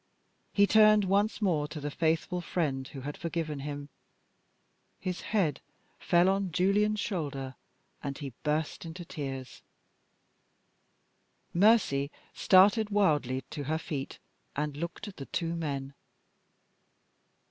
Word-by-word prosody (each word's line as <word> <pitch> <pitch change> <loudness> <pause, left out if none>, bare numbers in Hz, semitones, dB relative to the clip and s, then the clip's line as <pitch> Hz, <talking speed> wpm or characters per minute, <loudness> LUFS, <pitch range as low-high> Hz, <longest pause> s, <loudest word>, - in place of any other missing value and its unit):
He 200 - +5
turned 215 0 +6
once 205 +3 +1
more 155 -7 +2
to 150 - -7
the 145 0 -4
faithful 165 +3 0
friend 140 -7 -1
who 135 - -8
had 145 +3 -5
forgiven 165 -3 -3
him. 145 0 -5 1.1
His 180 -1 -3
head 185 -10 0 0.4
fell 175 +1 +4
on 195 -1 +1
Julian's 205 +5 +2
shoulder, 140 -10 -3 0.5
and 140 -1 -4
he 140 -4 -6
burst 150 0 -1
into 170 +1 -7
tears. 135 -5 -6 1.9
Mercy 175 -8 +4 0.2
started 205 +3 +5
wildly 150 - +2
to 145 -3 -5
her 155 +3 0
feet, 145 -4 -5 0.4
and 150 0 -2
looked 170 +7 -5
at 200 - -10
the 135 - -7
two 170 -1 -2
men. 140 -4 -3
160 Hz, 120 wpm, -30 LUFS, 145-190 Hz, 1.9 s, turned